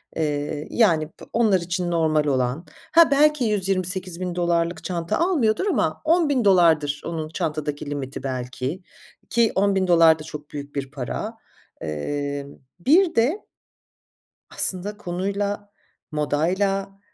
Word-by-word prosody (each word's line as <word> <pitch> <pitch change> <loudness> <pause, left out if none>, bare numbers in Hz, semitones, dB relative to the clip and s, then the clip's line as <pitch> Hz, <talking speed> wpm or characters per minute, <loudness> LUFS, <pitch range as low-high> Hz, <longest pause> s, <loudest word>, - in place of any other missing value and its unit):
eee, 150 -1 -2
yani, 165 -10 +3
bı - - -15
onlar 215 -5 +3
için 175 0 -2
normal 155 -2 +2
olan 130 +3 0 0.3
Ha, 330 -3 +6
belki 300 -1 +4
$128.000 180 -4 -1
çanta 170 -2 -2
almıyordur 320 - +2
ama - - 0
$10.000 190 - +3
onun 160 -2 -4
çantadaki 150 -4 -3
limiti 140 -2 -5
belki 130 -2 -3
ki. 150 +9 -3 0.5
Ki 235 -1 +3
$10.000 180 -5 +4
da - - -7
çok 150 -1 -9
büyük 145 0 -7
bir 135 -1 -4
para. 155 - -5 0.5
Iıı, 140 - -3 0.3
bir 330 - +4
de 265 - +1 1.1
aslında 195 +3 -2
konuyla, 200 +2 -3 0.4
modayla, 190 +7 0
175 Hz, 110 wpm, -23 LUFS, 150-205 Hz, 1.1 s, Ha